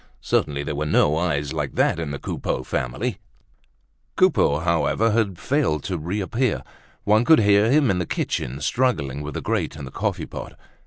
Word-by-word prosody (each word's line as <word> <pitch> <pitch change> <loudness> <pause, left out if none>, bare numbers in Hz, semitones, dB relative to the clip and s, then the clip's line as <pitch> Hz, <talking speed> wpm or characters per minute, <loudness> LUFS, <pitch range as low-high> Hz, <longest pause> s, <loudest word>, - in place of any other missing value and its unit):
Certainly 70 -1 0
there 75 - -3
were 75 +1 -2
no 75 0 +3
eyes 75 -4 -1
like - - -3
that - - +2
in 80 -3 -3
the 70 - -4
Coupeau 65 - -3
family. 90 - -3 1.0
Coupeau, 70 - +3
however, 85 +7 +1
had 105 -5 0
failed 85 - 0
to 95 -2 -3
reappear. 105 +8 -1 0.4
One 110 +2 +4
could 155 +1 +6
hear 105 +1 +4
him 140 -3 +4
in 90 - 0
the 90 - -2
kitchen 65 +3 -3
struggling 75 - 0
with 75 +1 -6
the - - -3
grate - - -1
and 75 -3 -7
the 65 - -9
coffee - - -2
pot. - - -8
85 Hz, 175 wpm, -23 LUFS, 75-110 Hz, 1.0 s, could